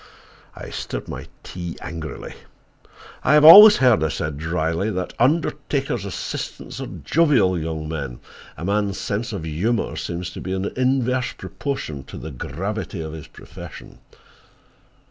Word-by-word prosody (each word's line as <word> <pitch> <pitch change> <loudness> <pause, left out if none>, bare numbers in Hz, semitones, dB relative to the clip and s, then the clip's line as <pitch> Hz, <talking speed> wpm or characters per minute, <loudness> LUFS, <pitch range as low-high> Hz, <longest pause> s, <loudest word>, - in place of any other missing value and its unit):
I - - -9
stirred - - -5
my - - -7 0.2
tea 85 -2 -7
angrily. 80 -1 -7 0.9
"I - - +4
have 150 0 +6
always 210 +6 +12
heard," 125 -9 +4
I - - +2
said 75 +1 -4
dryly, 80 +4 -1
"that 90 -3 -3
undertakers' 140 - 0
assistants 100 - -5
are - - -4
jovial 140 - +2
young 80 -1 -4
men. 70 -6 -5 0.4
A 80 - -5
man's 100 0 0
sense 105 +3 -3
of 100 -6 -5
humor 90 +10 -1
seems 90 +1 -4
to - - -8
be 95 - -4
in 95 0 -2
inverse 130 0 +1
proportion 80 - -5
to - - -10
the 80 - -7
gravity 95 - -5
of 80 -1 -6
his 80 0 -9
profession." - - -12
95 Hz, 145 wpm, -22 LUFS, 80-125 Hz, 0.9 s, always